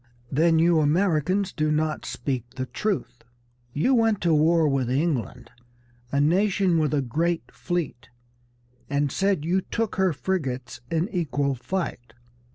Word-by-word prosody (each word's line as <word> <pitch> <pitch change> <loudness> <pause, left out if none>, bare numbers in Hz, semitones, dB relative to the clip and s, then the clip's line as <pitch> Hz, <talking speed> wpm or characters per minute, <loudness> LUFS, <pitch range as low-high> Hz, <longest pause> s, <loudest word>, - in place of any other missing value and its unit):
Then, 160 +4 +3
you 165 0 +4
Americans 180 +4 +1
do 155 -2 0
not 155 0 -1
speak 125 -3 -4
the 130 -1 -3
truth. 190 - -3 0.5
You 160 - +1
went 225 -4 +3
to 170 -2 +2
war 160 +1 +4
with 135 -3 0
England, 130 - -1 0.6
a 140 - +1
nation 180 +2 +2
with 150 -2 +1
a 145 -2 +1
great 165 +7 -1
fleet, 175 -9 -4 0.8
and 140 0 0
said 195 -6 0
you 185 +3 +1
took 225 +2 -3
her 190 -1 +3
frigates 130 -7 -3
in 165 +2 0
equal 145 - -1
fight. 120 -5 -4
160 Hz, 140 wpm, -25 LUFS, 140-185 Hz, 0.8 s, you